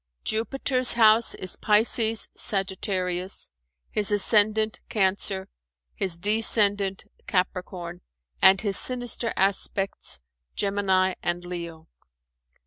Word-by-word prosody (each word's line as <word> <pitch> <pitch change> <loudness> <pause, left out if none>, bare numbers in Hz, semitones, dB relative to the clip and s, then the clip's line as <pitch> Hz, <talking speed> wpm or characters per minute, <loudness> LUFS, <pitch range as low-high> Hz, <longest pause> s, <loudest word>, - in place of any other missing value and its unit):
Jupiter's 255 +3 +1
house 225 0 +4
is 185 - -2
Pisces 220 +1 +3
Sagittarius, 190 - -1 0.4
his 210 -1 -1
ascendant 215 +1 +3
Cancer, 190 -1 -1 0.5
his 185 -4 -1
descendant 205 -1 +2 0.2
Capricorn 180 -2 -4 0.4
and 190 +1 +6
his 200 -3 -1
sinister 245 -2 -1
aspects 195 0 -2 0.4
Gemini 190 -2 0
and 175 0 -3
Leo. 170 -2 -8
195 Hz, 85 wpm, -24 LUFS, 185-215 Hz, 0.5 s, and